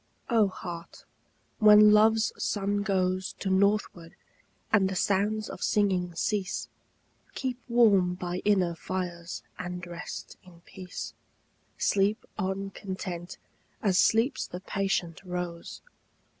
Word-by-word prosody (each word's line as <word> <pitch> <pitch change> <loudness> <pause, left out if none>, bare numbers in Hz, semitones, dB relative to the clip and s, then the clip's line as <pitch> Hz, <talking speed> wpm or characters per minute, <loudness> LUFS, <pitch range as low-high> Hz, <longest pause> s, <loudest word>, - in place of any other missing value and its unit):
O 220 -3 +5
Heart, 170 -3 -8 0.5
when 210 -1 +8
Love's 220 +1 +4
sun 205 0 -1
goes 185 -2 0
To 190 - -3
northward, 190 -3 +1 0.6
and 195 -3 +4
the 190 - -4
sounds 205 +3 +1
of - - -8
singing 185 -4 +1
cease, 195 +2 -2 0.7
Keep 255 -2 -3
warm 200 -7 +4
by 180 0 -4
inner 190 -5 +2
fires, 175 -1 -5 0.2
and 180 0 -5
rest 175 0 -8
in 175 -2 -17
peace. 185 +1 -8 0.6
Sleep 200 +2 +1
on 195 0 -2
content, 185 -3 -6 0.5
as 190 -3 +3
sleeps 225 +7 +2
the 180 - -7
patient 190 -3 -2
rose. 180 -2 -5
190 Hz, 115 wpm, -28 LUFS, 180-210 Hz, 0.7 s, when